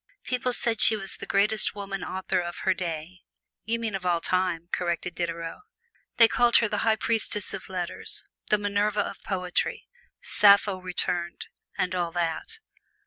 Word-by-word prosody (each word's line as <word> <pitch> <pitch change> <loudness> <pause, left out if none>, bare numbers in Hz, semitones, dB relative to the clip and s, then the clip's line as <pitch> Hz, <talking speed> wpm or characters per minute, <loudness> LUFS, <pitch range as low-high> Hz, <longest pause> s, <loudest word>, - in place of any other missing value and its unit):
People 250 0 -1
said 230 -2 +3
she 225 - +7
was 195 -2 -3
the - - -8
greatest 210 +2 +2
woman 195 -1 -5
author 190 0 -2
of 175 -1 -4
her 190 - +4
day. 175 0 -5 0.4
"You 230 +1 0
mean 225 -2 -3
of 195 -1 -3
all 175 -2 +1
time," 180 -1 0
corrected 175 0 -2
Diderot. 170 -1 -4 0.6
They 230 - +8
called 240 +1 +3
her 230 - +3
"the 210 -1 -2
High 225 -1 +3
Priestess 220 -2 -1
of 190 -1 -7
Letters," 180 -2 -4 0.3
"the 210 - +4
Minerva 205 +1 0
of - - -6
Poetry," 180 -2 -2 0.3
"Sappho 200 -2 +4
Returned," 175 -1 -2 0.3
and 180 - 0
all 175 -2 -1
that. 175 - -2
190 Hz, 160 wpm, -26 LUFS, 175-210 Hz, 0.6 s, They